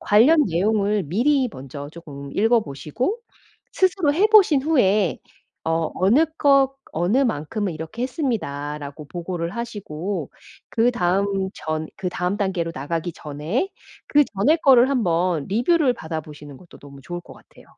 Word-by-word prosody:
관련 285 +10 +5
내용을 205 +3 +1
미리 255 - +2
먼저 140 +2 -8
쪼끔 140 -4 -10
읽어보시고 225 - 0 0.5
스스로 370 -5 +2
해 385 +7 +4
보신 390 -10 +6
후에 210 - +2 0.5
어, 165 -1 0
"어느 225 - +4
것, 275 -2 +4 0.2
어느 175 +10 +1
만큼은 205 - -1
이렇게 160 +9 -6
했습니다."라고 150 - -4
보고를 175 0 -4
하시고 195 - -5 0.4
그다음 195 -4 +1
전 155 0 -3
그다음 180 0 -2
단계로 185 -5 -1
나가기 165 +5 -3
전에 155 - -3 0.4
그 295 0 +5
전의 295 +12 +3
거를 260 -2 +6
한 255 -5 +1
번 170 -3 0
리뷰를 250 - +2
받아보시는 150 - -7
것도 175 - -16
너무 140 -1 -13
좋을 175 +6 -6
것 - - -14
같아요. - - -19
190 Hz, 295 characters per minute, -22 LUFS, 160-250 Hz, 0.5 s, 보신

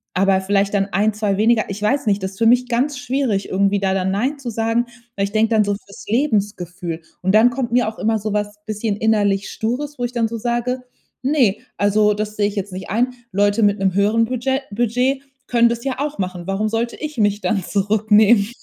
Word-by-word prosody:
Aber 190 +1 +3
vielleicht 200 +1 +1
dann 195 -1 +1
1, 210 +3 +2
2 210 -2 -1
weniger. 220 +1 +3
Ich 200 +1 -5
weiß 265 +4 +1
nicht, 200 -1 +2
das 190 - -2
ist 190 - -15
für 230 - +4
mich 250 +2 +4
ganz 255 +4 0
schwierig, 250 -5 -1
irgendwie 200 +1 +2
da 190 -1 0
dann 190 -1 0
„nein“ 260 +9 -1
zu 260 -3 -5
sagen. 225 +2 0 0.3
Weil 195 - 0
ich 200 - -6
denke 220 +1 +2
dann 215 - +5
so 205 0 0
fürs 200 -1 -13
Lebensgefühl. 200 - -1 0.2
Und 190 +1 +1
dann 230 +3 +6
kommt 240 -2 -3
mir 245 -1 +2
auch 220 - -5
immer 220 +1 +1
so 210 0 -3
was 205 0 -2
bisschen 215 -1 -2
innerlich 205 -3 +1
Stures, 265 +5 -3
wo - - -2
ich 240 - -4
dann 235 -2 +1
so 230 +1 -5
sage: 240 +2 -1 0.4
„Ne, 255 -7 +2 0.2
also 210 +1 +3
das 210 0 -4
sehe 205 -1 +2
ich 205 - -5
jetzt 200 -1 -4
nicht 185 +1 -7
ein. 235 +5 +1 0.2
Leute 205 +3 +2
mit 205 0 +3
'nem 190 -1 +1
höheren 210 +4 +3
Budget 255 +3 -1
Budget 250 +5 0 0.3
können 235 -1 +4
das 235 0 -3
ja 265 -2 -1
auch 295 +1 -2
machen. 180 -2 -4
Warum 200 +3 0
sollte 230 +2 -2
ich 305 -2 -6
mich 205 0 +2
dann 205 -5 0
zurücknehmen? 210 +2 +3
215 Hz, 220 wpm, -20 LUFS, 200-240 Hz, 0.4 s, dann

